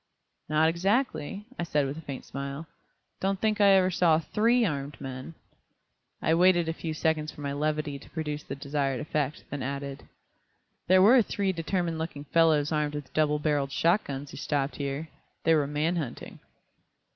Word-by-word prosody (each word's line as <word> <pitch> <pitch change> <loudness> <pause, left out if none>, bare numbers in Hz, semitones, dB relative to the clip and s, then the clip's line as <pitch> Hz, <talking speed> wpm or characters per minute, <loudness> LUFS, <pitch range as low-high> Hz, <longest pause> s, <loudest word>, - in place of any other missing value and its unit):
"Not 155 +1 +4
exactly," 195 - 0
I - - 0
said 150 -4 +1
with 135 +1 -3
a 160 - -8
faint 140 -4 -7
smile. 140 +3 -5 0.5
"Don't 195 0 0
think 215 0 +1
I 200 - +7
ever 185 -1 +4
saw 170 -3 +4
THREE 230 +9 +2
armed 145 -4 -3
men." 130 +4 -7 0.9
I 160 - +3
waited 175 0 +4
a 165 - 0
few 160 -1 -5
seconds 155 -1 0
for - - -12
my 140 -1 -2
levity 150 -1 -1
to - - -15
produce 150 -2 -4
the 135 - -6
desired 140 -2 -1
effect, 150 0 -2
then 145 - -4
added: 140 +1 -5 0.8
"There 185 +1 +6
were 240 +5 +7
three 200 -2 -1
determined 170 -1 -1
looking 160 -3 -5
fellows 155 -1 +3
armed 150 -1 0
with 145 -3 -7
double 150 -1 +2
barreled 145 -2 0
shot 170 +9 +2
guns 140 0 -6
who - - -9
stopped 145 0 -1
here. 140 +2 -3 0.3
They 165 - +4
were 150 -3 +2
man 155 +4 0
hunting." 145 -8 -6
155 Hz, 175 wpm, -28 LUFS, 145-170 Hz, 0.9 s, I